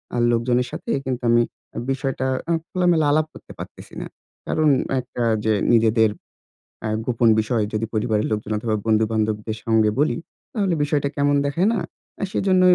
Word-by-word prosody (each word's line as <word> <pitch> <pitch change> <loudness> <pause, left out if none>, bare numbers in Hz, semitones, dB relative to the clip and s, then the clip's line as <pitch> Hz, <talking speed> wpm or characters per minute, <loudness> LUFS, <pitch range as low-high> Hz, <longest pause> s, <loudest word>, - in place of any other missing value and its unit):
আ - - 0
লোকজনের 120 +1 +1
সাথে - - -7 0.2
কিন্তু 125 -1 -3
আমি 120 0 +5 0.5
বিষয়টা 135 -1 -2 0.2
আ - - +2 0.2
খোলামেলা 175 -4 +2
আলাপ 155 +1 +3
করতে - - -13
পারতেছি - - -10
না। - - -5 0.4
কারণ 155 -1 +2 0.3
একটা 125 -1 -4 0.2
যে 110 - +3 0.2
নিজেদের 110 -1 +4 0.7
অ্যাঁ 110 0 -1
গোপন 120 -1 +2
বিষয় 110 0 0
যদি 110 +1 -1
পরিবারের 110 0 +1
লোকজন 105 0 -2
অথবা 110 0 -1
বন্ধু-বান্ধবদের 110 0 +1
সঙ্গে 110 -2 +3
বলি, 150 - +2 0.4
তাহলে 195 -6 +1
বিষয়টা 145 -1 +1
কেমন 145 0 +3
দেখায় 170 +9 +1
না? - - 0 0.5
সেজন্যই 185 -2 +4
120 Hz, 150 wpm, -22 LUFS, 110-145 Hz, 0.7 s, আমি